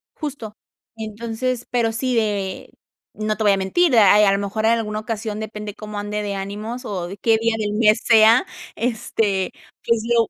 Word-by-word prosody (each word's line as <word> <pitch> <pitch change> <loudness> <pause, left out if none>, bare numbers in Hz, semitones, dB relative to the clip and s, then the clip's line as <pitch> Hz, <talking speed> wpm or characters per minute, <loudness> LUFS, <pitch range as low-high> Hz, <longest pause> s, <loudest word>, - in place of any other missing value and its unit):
justo. 270 -9 -6 0.4
Entonces, 230 +3 -4
pero 235 -2 +1
sí 250 +3 -1
de 205 -4 -2 0.4
no 215 0 -2
te 220 - -1
voy 205 - +5
a 195 - +2
mentir, 250 - +2
a 205 -2 +7
a 210 -1 +5
lo 195 - +1
mejor 205 +2 -2
en 225 - +5
alguna 215 -2 -1
ocasión 215 -1 -4
depende 210 -1 -6
cómo 210 -1 -7
ande 210 0 -3
de 200 -1 -3
ánimos, 210 +6 -5
o, 180 -4 -4
de 195 - -8
qué 225 +2 +3
día 230 0 +1
del 210 -1 -2
mes 215 0 +3
sea, 225 +6 +6 0.3
este, 230 -1 -2
sea. 190 -2 +1
Este, - - -16 0.3
pues 230 -1 +2
lo 230 -2 +3
215 Hz, 200 wpm, -21 LUFS, 205-230 Hz, 0.4 s, a